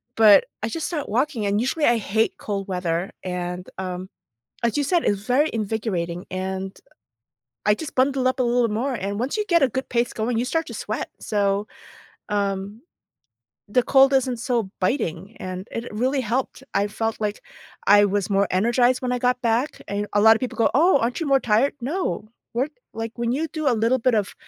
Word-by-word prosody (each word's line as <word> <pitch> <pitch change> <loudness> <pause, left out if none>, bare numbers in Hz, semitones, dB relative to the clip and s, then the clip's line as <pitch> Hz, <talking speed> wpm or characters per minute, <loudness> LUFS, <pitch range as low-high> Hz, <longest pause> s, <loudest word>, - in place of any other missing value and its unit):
but 215 -2 +7 0.2
I 220 - -1
just 325 +5 -3
started 305 -5 -3
walking, 245 -3 0
and 200 +1 +1
usually 270 +6 0
I 240 -3 +4
hate 220 +1 0
cold 200 -1 -4
weather, 180 -1 -2
and, 180 0 -4
um, 185 0 -4 0.6
as 235 - +1
you 295 - +2
said, 340 +4 +1
it's 200 -1 +1
very 260 +8 +2
invigorating, 195 -6 -2
and, 190 +1 -4
uh, - - -31 0.8
I 210 - +6
just 310 +6 -8
bundle 260 0 +3
up 255 - -1
a 255 - +2
little 240 -1 +2
more, 245 +6 -1
and 200 -1 -3
once 260 - -1
you 425 - 0
get 335 -6 +4
a 265 - +3
good 260 +3 -4
pace 240 0 0
going, 225 +1 -1
you 240 - +1
start 325 +5 -1
to - - -7
sweat, - - -4
so, 200 0 0 0.6
um, 200 +1 -2 0.9
the 250 +5 +3
cold 270 +1 +5
isn't 260 -2 +2
so 235 -4 -1
biting, 185 - -1
and 185 +1 -6
it 230 +1 -5
really 255 +6 0
helped, 250 +3 -2
I 200 +1 +3
felt 225 +2 -3
like 210 -1 -2 0.5
I 205 +1 +7
was 200 0 -1
more 200 0 +2
energized 240 +6 +3
when 250 -1 -1
I 250 - +1
got 250 0 +1
back, 240 +5 0
and 205 +1 -2
a 205 - +3
lot 220 +1 +8
of - - -2
people 255 - -4
go, 230 - +3
"Oh, 320 0 +5
aren't 235 +2 -1
you 330 - -2
more 275 -1 +4
tired?" 235 +4 +2
No. 270 - -2 0.2
Work 260 +6 -1 0.2
like, 225 0 -4
when 235 0 0
you 310 +5 -1
do 310 -2 -3
a 245 - +4
little 230 +4 +2
bit 245 0 +2
of 205 -3 0
230 Hz, 205 wpm, -23 LUFS, 200-260 Hz, 0.9 s, lot